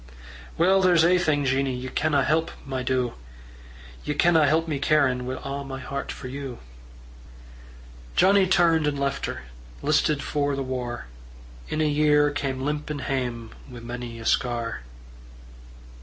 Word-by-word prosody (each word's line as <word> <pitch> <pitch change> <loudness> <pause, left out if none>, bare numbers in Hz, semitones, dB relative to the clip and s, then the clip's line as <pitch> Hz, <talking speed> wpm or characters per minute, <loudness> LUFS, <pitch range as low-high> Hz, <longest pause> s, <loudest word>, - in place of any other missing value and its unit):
"Well, 190 +3 +4
there's 175 -3 +5
ae 180 +1 +4
thing, 150 -4 +1
Jeannie, 135 0 +1
Ye 125 +1 -5
canna 150 -1 +1
help, 160 +4 +1 0.2
my 130 -2 -3
doo 125 -1 0 0.9
Ye 150 - -2
canna 160 0 +4
help 160 +3 +2
me 150 -3 -2
carin' 130 -4 +2
Wi' 130 - -3
a' 140 +1 -4
my 135 -1 -6
hert 140 +1 -5
for 130 - -8
you." 135 -2 -6 1.6
Johnnie 195 0 +5
turned 165 -4 +3
and 145 -1 -1
left 140 0 -1
her, - - -6 0.4
Listed 150 -2 +2
for 145 -1 -1
the 135 - -2
war; 125 -2 -4 0.6
In 155 - -1
a 155 - +2
year 150 0 +3
cam' 135 -2 -3
limpin' 150 0 -3
Hame 120 -5 -3 0.2
wi' 125 -2 -9
mony 120 0 -6
a 115 - -9
scar. 120 - 0
140 Hz, 150 wpm, -25 LUFS, 130-155 Hz, 1.6 s, there's